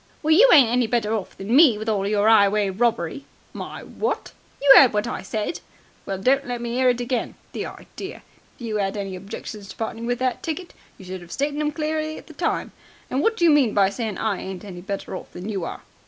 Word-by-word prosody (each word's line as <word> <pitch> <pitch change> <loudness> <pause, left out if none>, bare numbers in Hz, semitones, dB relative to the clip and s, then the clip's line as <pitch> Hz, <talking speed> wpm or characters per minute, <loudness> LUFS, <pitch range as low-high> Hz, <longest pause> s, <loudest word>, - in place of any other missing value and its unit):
"Well, 310 +1 +4
you 470 +10 +7
ain't 275 -7 +8
any 245 -1 +2
better 225 -2 0
off 210 -4 -4
than 200 +5 -1
me, 280 -7 +7
with 215 +1 -6
all 200 -3 0
your 205 0 +2
'ighway 205 -2 +4
robbery!" 230 +2 -1 0.3
"My - - -7
what!" 450 - -3 0.3
"You 275 -1 +8
'eard 250 -2 +8
what 210 0 0
I - - -4
said." 215 - -3 0.5
"Well, 195 - -2
don't 260 +8 +2
let 245 -1 -3
me 235 +1 -3
'ear 255 -1 +4
it 245 -1 +1
again. 245 0 -2 0.2
The - - -4
idea! - - -9 0.3
If - - -21
you 215 -2 -2
'ad 195 +1 -1
any 195 -2 -4
objections 200 +2 -8
to - - -9
parting 225 +1 -4
with 245 0 0
that 255 0 -1
ticket, 345 +2 -5 0.2
you 190 - -13
should 185 0 -6
have 175 -1 -13
stated 285 +1 -2
them 300 0 0
clearly 310 0 -2
at - - -11
the - - -13
time. - - -2 0.4
And 260 - +1
what 450 +6 +1
do 345 - +3
you 330 - +6
mean 270 -8 +3
by 195 -1 +4
saying 220 -3 -4
I 215 -3 -1
ain't 190 0 -7
any 180 -3 -8
better 195 0 -5
off - - -9
than 180 +4 -6
you 195 -5 -2
are?" - - -6
225 Hz, 235 wpm, -23 LUFS, 200-270 Hz, 0.5 s, ain't